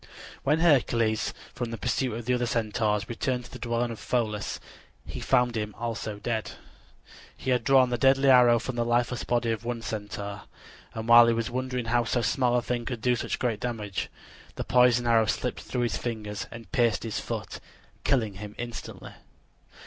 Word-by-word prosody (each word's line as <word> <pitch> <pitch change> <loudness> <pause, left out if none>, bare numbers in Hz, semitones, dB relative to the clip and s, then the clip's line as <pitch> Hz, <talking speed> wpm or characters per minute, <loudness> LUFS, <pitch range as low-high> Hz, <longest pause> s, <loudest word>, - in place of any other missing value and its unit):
When 150 +4 +2
Hercules 115 -8 +3 0.2
from 120 -2 -4
the 115 - -5
pursuit 125 0 -1
of 115 0 -6
the 125 - +1
other 120 -1 0
Centaurs 110 -2 0
returned 125 +1 -2
to - - -14
the - - -9
dwelling 120 0 -1
of 115 - -7
Pholus 110 -4 -2 0.5
he - - -7
found 125 -2 +2
him 105 -1 -3
also 115 -2 -4
dead. 110 +1 -3 0.8
He 130 - -2
had 125 - +2
drawn 130 -2 +4
the 120 - -1
deadly 135 +1 +4
arrow 125 -2 +7
from 120 +2 -4
the 120 - +2
lifeless 120 +1 0
body 120 -1 0
of 115 0 -3
one 120 -1 -4
Centaur, 105 -2 -5 0.5
and 110 0 -5
while 120 0 +9
he 115 - +4
was 115 0 -2
wondering 125 -1 -2
how 120 +1 +2
so 120 0 0
small 125 +1 +2
a 120 - +1
thing 120 0 -2
could 120 -2 -4
do 125 +1 +2
such - - -3
great 115 -4 -1
damage, 105 -5 -3 0.5
the - - -3
poisoned 125 -1 +4
arrow 115 -2 +4
slipped - - -2
through 125 - -3
his 115 -4 -1
fingers 105 -4 -4
and 115 -1 -11
pierced 120 -6 +2
his 115 -2 -3
foot, - - -5 0.4
killing 110 -6 +1
him 105 0 -8
instantly. 120 -1 -7
120 Hz, 185 wpm, -27 LUFS, 110-125 Hz, 0.8 s, while